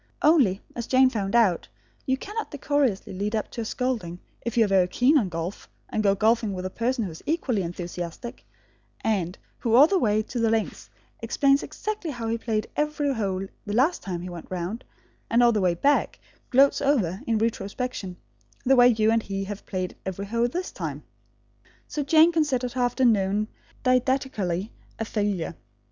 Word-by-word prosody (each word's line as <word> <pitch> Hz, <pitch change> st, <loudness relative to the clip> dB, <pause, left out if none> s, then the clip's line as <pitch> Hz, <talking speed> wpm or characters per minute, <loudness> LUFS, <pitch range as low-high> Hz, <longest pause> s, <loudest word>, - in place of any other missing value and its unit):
Only, 260 Hz, -, +4 dB
as 235 Hz, -1 st, -4 dB
Jane 260 Hz, 0 st, +5 dB
found 205 Hz, -3 st, -2 dB
out, 210 Hz, -8 st, +3 dB, 0.4 s
you 260 Hz, 0 st, +2 dB
cannot 425 Hz, +9 st, -5 dB
decorously 285 Hz, -9 st, 0 dB
lead 205 Hz, +4 st, -2 dB
up 215 Hz, -, -2 dB
to 235 Hz, -, -4 dB
a -, -, -4 dB
scolding 220 Hz, -9 st, -2 dB, 0.2 s
if 235 Hz, 0 st, -4 dB
you 225 Hz, -, +6 dB
are -, -, -1 dB
very 190 Hz, -2 st, +3 dB
keen 250 Hz, -, +3 dB
on 225 Hz, -10 st, +3 dB
golf, 165 Hz, +3 st, -5 dB, 0.2 s
and 215 Hz, -, -1 dB
go 200 Hz, -2 st, +3 dB
golfing 220 Hz, 0 st, +2 dB
with 185 Hz, 0 st, -5 dB
a 185 Hz, -, -3 dB
person 240 Hz, +2 st, -1 dB
who 190 Hz, -, -4 dB
is 160 Hz, -, -11 dB
equally 280 Hz, -, 0 dB
enthusiastic, 175 Hz, +5 st, -6 dB, 0.6 s
and 190 Hz, -5 st, -1 dB, 0.2 s
who 230 Hz, -2 st, +1 dB
all 270 Hz, +4 st, +9 dB
the 380 Hz, +3 st, +2 dB
way 215 Hz, -5 st, +2 dB
to 240 Hz, +3 st, -5 dB
the 230 Hz, -1 st, +2 dB
links 220 Hz, -1 st, -2 dB, 0.3 s
explains 275 Hz, -1 st, +2 dB
exactly 425 Hz, -6 st, -4 dB
how 240 Hz, -5 st, -4 dB
he 230 Hz, +1 st, -1 dB
played 220 Hz, -2 st, -1 dB
every 300 Hz, -1 st, 0 dB
hole 195 Hz, -5 st, -2 dB, 0.2 s
the 205 Hz, -, -2 dB
last 290 Hz, +9 st, +2 dB
time 180 Hz, -3 st, -4 dB
he 180 Hz, -, -6 dB
went 175 Hz, -2 st, -9 dB
round, 185 Hz, +6 st, -4 dB, 0.5 s
and 235 Hz, +1 st, +4 dB
all 240 Hz, -, +6 dB
the 215 Hz, -3 st, 0 dB
way 180 Hz, -2 st, +2 dB
back 285 Hz, +11 st, +2 dB, 0.3 s
gloats 275 Hz, +2 st, +4 dB
over, 225 Hz, -, +1 dB
in 225 Hz, -, +2 dB
retrospection, 215 Hz, -3 st, -3 dB, 0.5 s
the 270 Hz, +1 st, +5 dB
way 245 Hz, -1 st, +7 dB
you 220 Hz, -2 st, +3 dB
and 225 Hz, 0 st, +3 dB
he 195 Hz, -2 st, -4 dB
have 205 Hz, +1 st, -7 dB
played 185 Hz, -2 st, -3 dB
every 190 Hz, +1 st, -4 dB
hole 230 Hz, +3 st, +1 dB
this 360 Hz, +9 st, -4 dB
time. -, -, -5 dB, 0.8 s
So 295 Hz, -, -3 dB
Jane 315 Hz, +4 st, +6 dB
considered 270 Hz, -7 st, 0 dB
her 255 Hz, -, -2 dB
afternoon, 215 Hz, -4 st, +2 dB, 0.3 s
didactically, 250 Hz, -7 st, 0 dB, 0.3 s
a 225 Hz, -, -3 dB
failure. 205 Hz, -7 st, -2 dB
225 Hz, 185 wpm, -25 LUFS, 195-260 Hz, 0.8 s, all